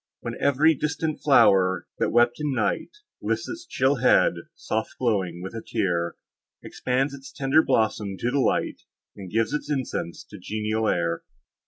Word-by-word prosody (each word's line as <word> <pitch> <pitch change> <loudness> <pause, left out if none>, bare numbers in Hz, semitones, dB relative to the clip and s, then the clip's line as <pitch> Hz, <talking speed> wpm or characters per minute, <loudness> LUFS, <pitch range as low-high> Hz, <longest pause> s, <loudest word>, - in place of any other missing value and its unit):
When - - -4
ev'ry 145 +2 +3
infant 155 +1 -2
flower, 95 - +4
that - - +1
wept 120 0 +3
in 150 -3 -1
night, 105 -4 0 0.3
Lifts - - -1
its 345 0 -7
chill 135 +2 +1
head 125 +1 +4 0.2
soft 110 +1 -3
glowing 95 -8 -1
with 95 - -6
a 115 - -5
tear, 85 -5 -1 0.5
Expands 135 +3 -1
its 135 0 -10
tender 135 +3 +3
blossom 105 -6 0
to 120 - -1
the 140 - +1
light, - - 0 0.3
And 95 -3 -9
gives 110 +3 0
its 150 - -3
incense 130 - -3
to 105 - -9
the - - -16
genial 110 +1 -1
air. 85 -1 0
115 Hz, 165 wpm, -25 LUFS, 95-135 Hz, 0.5 s, flower